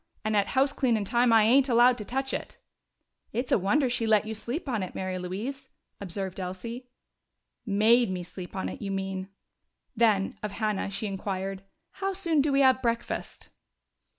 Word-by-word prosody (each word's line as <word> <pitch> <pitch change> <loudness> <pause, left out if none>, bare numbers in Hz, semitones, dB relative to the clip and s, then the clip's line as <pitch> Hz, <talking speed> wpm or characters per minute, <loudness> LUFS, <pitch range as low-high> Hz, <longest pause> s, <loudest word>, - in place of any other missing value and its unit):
And 215 0 +1
at 200 -1 +3
house 275 +1 +4
cleanin' 235 -8 +1
time 240 +3 +3
I 225 -1 +6
ain't 260 +5 +4
allowed 240 +1 +5
to 210 - -6
touch 265 +3 -2
it!" - - -5 0.8
"It's 245 +3 -2
a - - +4
wonder 260 +9 +2
she 240 -2 -1
let 215 -1 +4
you 220 - -4
sleep 240 +9 -4
on 235 -6 -1
it, 185 - -5
Mary 185 -1 -3
Louise," 235 +10 -5 0.3
observed 190 0 -5
Elsie. 210 +7 -6 0.8
"Made 220 +3 +4
me 180 -1 -3
sleep 180 +1 -9
on 190 - -2
it, - - -7
you 200 - -4
mean." 190 -1 -3 0.7
Then, 215 -4 +2
of 210 -2 -4
Hannah, 215 -3 -1
she 200 +2 -4
inquired, 195 -1 -3 0.3
"How 390 0 -3
soon 335 -6 +2
do 290 +1 +1
we 275 0 +3
have 260 -1 +5
breakfast?" 235 -1 -3
220 Hz, 180 wpm, -28 LUFS, 195-250 Hz, 0.8 s, I